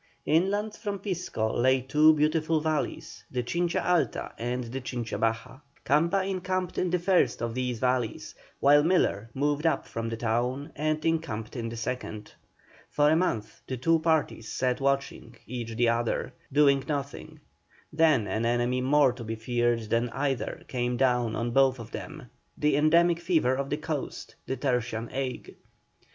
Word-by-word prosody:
Inland 200 +7 +1
from 205 -2 -4
Pisco 180 - -2
lay 130 +2 +3
two 150 +5 +4
beautiful 155 +1 +1
valleys, 155 -1 -3
the 125 -1 -2
Chincha 170 +6 -1
Alta 180 -2 0
and 125 +2 -2
the 125 +3 -5
Chincha 120 -2 -4
Baja. 115 +3 -1 0.3
Camba 170 +7 +2
encamped 185 -1 -2
in 180 - +1
the 180 - +2
first 180 +1 +2
of 115 0 -3
these 125 -1 -2
valleys, 125 -2 -1 0.3
while 145 +1 +6
Miller 145 - +1
moved 145 +3 +1
up 160 - 0
from 115 0 -4
the 115 - -4
town 125 +6 -1
and 155 +1 -1
encamped 155 -10 -2
in 115 -2 -3
the 115 - -7
second. 110 -2 -5 0.6
For 150 0 +3
a - - +4
month 160 -11 -1
the 130 - -3
two 165 +6 +3
parties 160 -8 0
sat 125 0 -1
watching, 135 -3 -1
each 115 -2 -5
the 120 0 +3
other, 120 +2 -1 0.2
nothing 140 -1 +4 0.5
doing, 155 - -18 0.5
then 155 -8 +4
an 110 +2 -2
enemy 120 +2 +1
more 135 0 +4
to 125 -2 -8
be 115 0 -4
feared 120 +1 0
than 115 +2 0
either 135 0 -2
came 125 -1 -1
down 125 -3 +2
on 120 +2 -2
both 135 +1 +4
of 115 -1 -10
them, 155 -5 -8 0.3
the 150 -1 +2
endemic 170 +3 +4
fever 160 -7 +2
of 140 +1 -2
the 145 - -1
coast, 150 -2 -5
the 130 - -2
tertian 120 -3 -1
ague. 130 -1 -4
130 Hz, 165 wpm, -28 LUFS, 120-155 Hz, 0.6 s, while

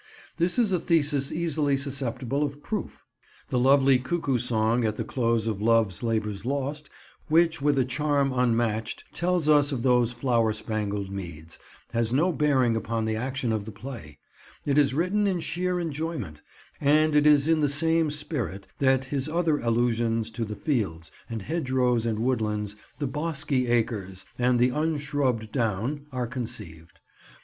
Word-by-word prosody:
This 175 +5 +1
is 230 -5 +3
a 180 - +2
thesis 145 -5 +1
easily 155 -4 0
susceptible 135 -1 -3
of 145 0 -3
proof. 215 -2 -5 0.5
The 125 - +1
lovely 135 0 +5
cuckoo 135 -1 -1
song 115 0 +1
at 110 -1 -1
the - - -1
close 115 -3 0
of 105 -3 -2
Love's 110 -5 +2
Labour's 110 -3 -1
Lost, 140 +3 -3 0.4
which 165 0 +3
with 145 0 +2
a 130 - +3
charm 140 +1 0
unmatched 115 -3 0
tells 175 -3 0
us 145 -1 +5
of 125 -4 -2
those 125 -2 +3
flower 120 -3 +1
spangled 105 -2 -3
meads, 85 -4 -8 0.3
has 115 -1 0
no 160 +8 +3
bearing 135 -6 +2
upon 115 +1 -2
the 110 0 -1
action 130 +1 -2
of 110 -2 -1
the 110 - -7
play: 105 - -9 0.5
it 145 0 +3
is 135 -2 +3
written 195 +6 +1
in 185 -3 0
sheer 180 +2 -1
enjoyment, 155 - -4 0.4
and 155 +1 +3
it 150 0 +5
is 145 -1 +5
in 165 -1 +3
the 145 -2 +2
same 160 +2 +2
spirit 125 - -4
that 130 -1 +3
his 135 +2 -2
other 160 -2 +1
allusions 115 -1 0
to 115 +1 -3
the 105 -1 -4
fields 90 - -2 0.2
and 115 -3 -4
hedgerows 130 - 0
and 110 -2 -1
woodlands, 105 -4 -1 0.2
the 145 - -2
"bosky 145 -3 -1
acres" 105 -6 -1
and 125 0 +3
the 125 +1 +4
"unshrubbed 145 -6 -1
down," 125 +5 -1
are 125 -1 -2
conceived. 115 -10 -7
130 Hz, 160 wpm, -26 LUFS, 115-150 Hz, 0.5 s, lovely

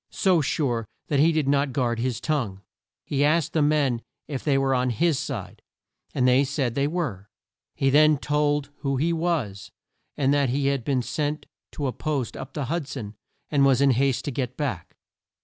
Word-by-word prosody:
So 185 -4 +2
sure 125 -6 -1 0.2
that 145 - +2
he 160 +3 +5
did 155 -3 0
not 140 -1 +2
guard 120 -3 0
his 120 -1 -1
tongue. 120 -11 -2 0.4
He 140 -1 0
asked 155 0 +2
the 155 - +2
men 145 -5 +2 0.3
if 140 -4 -4
they 140 -3 +2
were 135 0 +2
on 125 0 +1
his 155 +4 +1
side, - - -5 0.5
and 125 -1 +3
they 130 +2 +5
said 135 -3 -1
they 140 +3 +1
were. 140 - -3 0.5
He 135 0 +2
then 155 +1 +6
told 145 0 0
who 135 -2 -1
he 165 +5 +1
was, 155 - -2 0.5
and 140 -1 +2
that 140 -3 +2
he 140 +3 0
had 140 -3 -1
been 130 -1 0
sent 150 +3 -2 0.3
to 145 - -3
a 130 - -1
post 140 -6 -2
up - - -8
the 145 - -3
Hud 160 +2 -2
son 110 -7 -6 0.4
and 140 -2 +3
was 135 -2 +4
in 140 -1 +5
haste 130 0 +1
to 145 - -2
get 125 -1 -3
back. 120 - -4
140 Hz, 195 wpm, -25 LUFS, 125-150 Hz, 0.5 s, then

